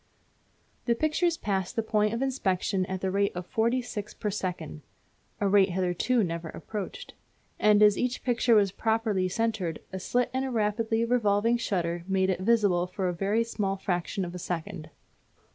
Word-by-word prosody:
The 235 - +2
pictures 320 +5 +1
passed 190 - -2
the 225 - 0
point 210 -1 +1
of 240 - -1
inspection 195 -7 0
at 190 -1 -4
the 190 - -1
rate 200 +1 +1
of 180 0 -4
forty 235 +6 +1
six 210 -4 -6
per 210 - -2
second 180 -6 -4 0.6
(a 205 - +1
rate 195 0 +5
hitherto 185 +6 +1
never 165 -2 -3
approached), 215 - -7 0.5
and 210 0 +5
as 210 -1 +5
each 250 0 -1
picture 240 -1 +3
was 200 -3 +4
properly 220 -4 0
centred 215 -6 -1
a 190 - -3
slit 245 +6 0
in 260 +1 0
a 265 - -2
rapidly 225 0 0
revolving 230 -1 +2
shutter 175 -6 -2
made 190 -1 +2
it 180 - -2
visible 190 -4 +2
for 185 +1 -2
a - - -2
very 200 +6 +1
small 200 -4 -2
fraction 185 +1 -2
of 175 - -7
a 180 - -6
second. 170 -1 -5
205 Hz, 175 wpm, -28 LUFS, 185-230 Hz, 0.6 s, rate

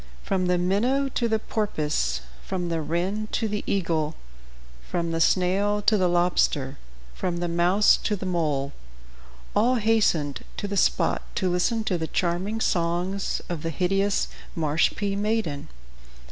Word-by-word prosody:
From 185 -2 0
the 180 0 +3
minnow 235 +10 +1
to 240 -2 0
the 220 - +2
porpoise, 155 - -1 0.2
from 180 -2 -3
the 165 -1 -1
wren 185 +7 -1
to 225 - +1
the 210 0 -3
eagle, 165 -5 0 0.7
from 170 -1 -1
the 165 0 0
snail 195 +4 +2
to 215 +1 +4
the 185 -3 +3
lobster, 175 -6 +1 0.3
from 175 - -2
the 175 0 -1
mouse 175 +4 +4
to 210 - -1
the 195 - -6
mole 150 -6 -1 0.8
all 240 +5 +4
hastened 210 - +1
to 205 - -3
the 200 - -3
spot - - +2
to 185 -4 +1
listen 220 +6 +1
to 185 -5 -1
the 160 - -2
charming 185 +7 -1
songs 175 +1 0
of 170 -3 -4
the 165 - -2
hideous 195 +5 +1 0.3
Marshpee 165 +6 +1
maiden. 205 -8 -1
180 Hz, 145 wpm, -25 LUFS, 170-205 Hz, 0.8 s, to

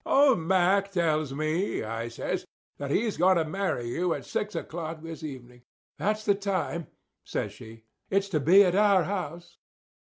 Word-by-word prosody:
"Old 275 -6 +4
Mack 190 +3 +2
tells 155 -5 +1
me," 155 - -1
I 115 +1 -4
says, 115 - -4 0.3
"that 140 -1 -4
he's 215 +8 0
going 185 +1 +4
to 165 - +1
marry 185 -8 -2
you 170 +8 0
at - - -7
six 210 0 -3
o'clock 160 -1 -5
this 165 -1 -7
evening." 125 -4 -9 0.4
"That's 215 +1 -1
the 205 - +5
time," 195 -4 -2 0.4
says - - -3
she. 110 0 -12 0.3
"It's 195 +1 +1
to 160 -5 +1
be 180 +8 +7
at 180 -2 +2
our 200 -1 +4
house." 175 -3 -5
175 Hz, 165 wpm, -28 LUFS, 155-195 Hz, 0.4 s, be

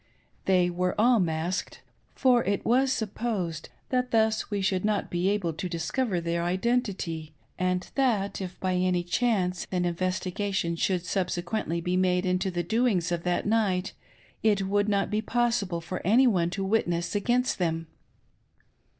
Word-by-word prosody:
They 180 -2 +3
were 180 +2 -1
all 240 +1 +5
masked, 170 +1 -2 0.3
for 250 -2 +4
it 200 0 -1
was 260 +3 +3
supfjosed 205 -8 -2 0.2
that 250 -1 0
thus 220 -1 +2
we 205 -1 -1
should 190 -1 0
not 210 -1 0
be 175 +2 +1
able 200 -5 0
to 180 +3 -4
discover 180 +5 -1
their 170 0 -1
identity, 185 -5 -1 0.2
and 180 0 0
that 220 -8 0
if 185 -1 -6
by 185 -1 0
any 180 -1 +1
chance 185 -2 0
an 180 -1 0
investigation 185 +1 -1
should 180 +1 0
subsequently 175 -1 -2
be 180 +2 0
made 180 0 +2
into 185 +1 +1
the 175 -1 -2
doings 205 -3 +1
of 170 -1 -1
that 180 0 0
night 200 -4 +1 0.5
it 205 -3 +2
would 205 +1 +1
not 200 0 +1
be 210 +1 +1
possible 220 -7 0
for 175 +3 -5
any 230 +8 +5
one 180 -8 +2
to 195 +2 -3
witness 175 -4 0
against 240 +4 +1
them. 165 -2 -1
185 Hz, 155 wpm, -27 LUFS, 175-215 Hz, 0.5 s, all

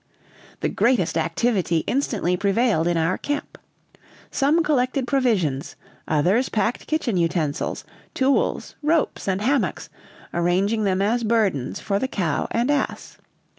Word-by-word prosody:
The - - 0
greatest 235 -8 +1
activity 170 0 0
instantly 220 -9 0
prevailed 200 -2 +1
in 175 -1 +1
our 165 +3 0
camp. 290 0 -4 0.7
Some 300 +5 +2
collected 265 -2 +1
provisions, 215 - 0 0.3
others 180 - +2
packed 220 +2 -1
kitchen 275 -10 0
utensils, 165 -4 -1 0.3
tools, 270 +1 +1
ropes, 310 -5 0
and 190 +1 0
hammocks, 275 +4 0 0.4
arranging 190 +6 +1
them 190 0 +1
as 235 +4 +1
burdens 210 - 0
for 200 -1 -1
the 260 - -1
cow 170 - -1
and 240 +5 +1
ass. 285 -2 -2
210 Hz, 125 wpm, -23 LUFS, 175-255 Hz, 0.7 s, Some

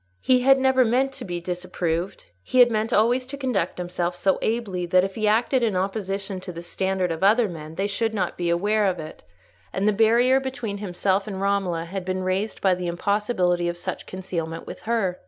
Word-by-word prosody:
He 255 -1 +4
had 270 +2 +5
never 265 -1 +4
meant 255 +4 +2
to - - -8
be 175 -1 -3
disapproved; 175 - -3
he 255 - -3
had 245 -1 +7
meant 220 0 -1
always 245 +4 +2
to 280 +1 -7
conduct 255 -7 -1
himself 175 0 -2
so 190 +1 +1
ably 200 -6 -1
that 180 +1 +4
if 195 0 -2
he 215 0 -1
acted 235 +4 +2
in 220 -5 +1
opposition 195 0 -2
to 185 - -7
the 170 0 -8
standard 190 0 -1
of 160 - -4
other 220 +3 +5
men 160 -3 -8
they 195 - -1
should 225 +2 -1
not 205 -4 -2
be 175 -1 -2
aware 205 +4 +2
of 185 -1 0
it; 155 -1 -9 0.5
and 195 +2 0
the 215 - +4
barrier 235 +5 +4
between 245 -6 -4
himself 195 0 0
and 195 -2 -5
Romola 195 -4 0
had 190 +2 -5
been 185 0 -2
raised 190 +4 -2
by 190 -2 +4
the 180 -1 -3
impossibility 180 -1 0
of 175 - -4
such - - -5
concealment 170 -3 -5
with - - -9
her. 195 -6 0
195 Hz, 210 wpm, -24 LUFS, 180-225 Hz, 0.5 s, had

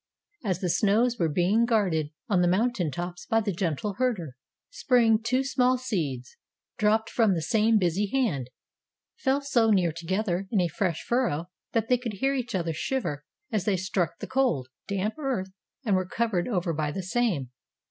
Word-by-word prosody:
As 185 -5 -1
the 180 - 0
snows 230 +6 +2
were 165 - +2
being 180 +9 +2
guarded 190 -10 +1 0.2
on 195 -6 +2
the 175 - +3
mountain 195 -1 +1
tops 175 +5 -6
by 225 -1 +3
the 210 -2 -1
gentle 185 +3 -2
herder 195 - -1 0.4
Spring 240 - +3
two 255 +4 +1
small 255 -1 +2
seeds, 155 - -3 0.4
dropped 220 +1 +3
from 220 -5 +2
the 165 - -1
same 220 +6 +3
busy 190 +2 +1
hand, 200 - 0 0.7
fell 270 +1 +1
so 240 -5 +2
near 185 -5 +3
together 185 +3 -2
in 210 - +1
a 175 - +2
fresh 170 0 -1
furrow 185 - 0 0.2
that 225 -1 +1
they 250 0 +3
could 240 -3 -4
hear 270 +8 0
each 245 -4 -2
other 170 -3 -1
shiver 155 - -2 0.3
as 215 -5 0
they 200 -3 +2
struck 185 -2 -1
the - - -6
cold, 250 - 0 0.2
damp 200 +2 -1
earth 245 -10 -2 0.3
and 205 -4 +3
were 185 -1 0
covered 210 -4 0
over 180 -7 0
by 150 -1 -1
the 190 +5 -4
same. 185 - 0
200 Hz, 180 wpm, -27 LUFS, 175-235 Hz, 0.7 s, the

